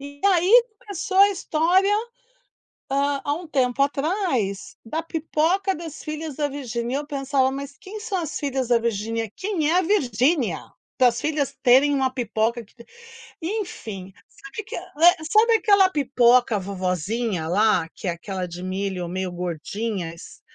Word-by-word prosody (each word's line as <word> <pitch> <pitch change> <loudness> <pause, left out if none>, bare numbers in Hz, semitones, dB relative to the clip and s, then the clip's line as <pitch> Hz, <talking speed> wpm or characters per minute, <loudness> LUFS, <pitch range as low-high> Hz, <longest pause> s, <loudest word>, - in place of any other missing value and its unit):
e 285 +1 -10
aí 395 +6 +5 0.2
começou 390 -2 -4
a 400 +1 +8
história, 365 +2 +2 1.0
ah, 280 0 +1
há 290 - +1
um 340 +3 -6
tempo 265 -2 0
atrás 275 - -1
da 315 +8 -3
pipoca 330 +4 0
das 325 -2 -8
filhas 305 -1 -5
da 295 - +1
Virginia, 245 -2 -3
e - - -1
eu 295 - -12
pensava: 275 -2 0
"Mas 275 +1 -6
quem 420 +3 -8
são 415 -3 -3
as 320 -3 -4
filhas 265 -4 -2
da 240 - +5
Virginia? 225 -1 -2
Quem 355 -6 -1
é 355 - +4
a - - +2
Virginia? 260 - +1 0.4
Para 250 -1 +7
as 235 - -5
filhas 295 -3 -1
terem 270 +3 +5
uma 265 -1 +2
pipoca 235 -1 -1
que" - - -27 0.7
enfim, 320 - -5 0.2
sabe 275 +10 -9
que - - -8
eh, - - -7 0.4
sabe 450 +2 +5
aquela 400 -3 +5
pipoca 250 - +3
vovozinha 190 0 -2
lá, 200 -1 +2
que 190 - -6
é - - +2
aquela 185 +1 -5
de 175 +1 -8
milho 185 -1 -3
meio 185 0 -3
gordinhas? 175 +1 -5
270 Hz, 155 wpm, -23 LUFS, 215-325 Hz, 1.0 s, a